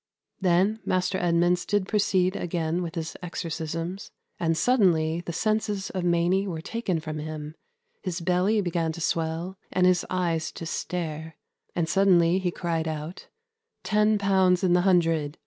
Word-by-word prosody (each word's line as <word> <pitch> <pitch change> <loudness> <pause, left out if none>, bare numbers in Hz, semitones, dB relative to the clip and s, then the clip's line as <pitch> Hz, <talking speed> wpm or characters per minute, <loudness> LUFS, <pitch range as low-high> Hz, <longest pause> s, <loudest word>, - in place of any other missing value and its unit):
'... - - -45
Then 190 +4 +2
Maister 185 +1 0
Edmunds 175 +1 +2
did 205 -1 0
proceede 195 -3 +2
againe 170 0 -1
with 170 -2 -5
his 160 -1 -4
exorcismes, 170 +1 -4 0.3
and 165 -2 +1
suddenly 170 -7 +2
the 175 - -4
sences 210 +1 -1
of 185 -2 -3
Mainy 175 +3 +2
were 165 -4 -4
taken 185 -1 -2
from 155 -1 -5
him, 155 0 -6 0.5
his 185 -2 -3
belly 185 +5 +2
began 170 -3 -1
to 170 - -8
swell, 165 +3 -2
and 180 - +2
his 180 -1 +4
eyes 170 -3 -1
to 165 - -7
stare, 160 -1 -4 0.4
and 170 -2 0
suddainly 180 -1 +4
he 185 -2 0
cried 165 -2 -2
out, 155 +3 -6 0.6
'Ten 210 +3 +3
pounds 190 -2 +3
in 180 -2 +3
the 180 - +4
hundred!' 165 -5 +2
175 Hz, 155 wpm, -26 LUFS, 165-190 Hz, 0.6 s, his